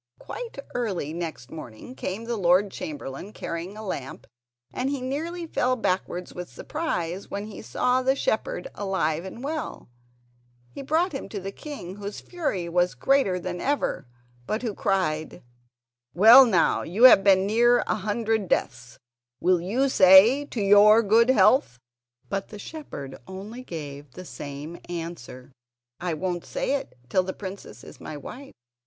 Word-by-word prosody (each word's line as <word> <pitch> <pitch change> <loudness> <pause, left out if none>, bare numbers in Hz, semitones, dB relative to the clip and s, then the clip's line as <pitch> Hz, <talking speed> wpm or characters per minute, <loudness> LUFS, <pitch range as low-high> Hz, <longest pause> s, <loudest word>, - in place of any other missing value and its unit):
Quite 475 - -8 0.2
early 195 -11 -2
next 165 -7 -6
morning 125 - -9
came 205 -3 -5
the 235 0 -2
Lord 190 0 +3
Chamberlain, 150 +5 -7
carrying 170 +5 -6
a 215 - -7
lamp 135 -8 -6 0.5
and 260 +2 -1
he 280 -1 -2
nearly 320 +7 -4
fell 255 -5 0
backwards 185 -5 -2
with 180 0 -7
surprise 195 - -4
when 200 +1 -4
he 215 -2 -9
saw 250 - +1
the 265 +1 +2
shepherd 220 -8 -2
alive 185 -5 -1
and 230 +6 -8
well. 305 - -5 0.8
He - - -7
brought 320 +7 +1
him 270 - -6
to 205 - -5
the 195 +1 -6
king, 200 - -8
whose 205 0 -6
fury 290 - -3
was 175 -3 +1
greater 260 - +2
than 180 0 -5
ever, 280 - -1 0.4
but 215 +3 -2
who 225 -4 -2
cried: 160 -6 -1 0.7
"Well, 230 +8 +9
now 180 -7 +2
you 195 +9 -2
have 250 -6 +9
been 190 -1 +5
near 240 +4 +4
a - - 0
hundred 215 0 -1
deaths; 125 -6 -2 0.4
will 180 -1 +2
you 235 +10 +1
say: 215 +5 +7
'To 240 -6 -4
your 205 +3 +7
good 225 +4 +4
health'?" 215 - +4 0.5
But 195 0 -3
the 210 - -10
shepherd 200 - -8
only 205 +6 -8
gave 145 - -8
the 185 - -9
same 145 +2 -8
answer: 165 -7 -7 0.5
"I 175 -2 -2
won't 175 +1 -3
say - - -2
it 280 - -4
till 185 - +2
the 190 +1 -5
princess 190 - -9
is - - -13
my 150 - -7
wife." 265 - -10
195 Hz, 155 wpm, -25 LUFS, 175-245 Hz, 0.8 s, Well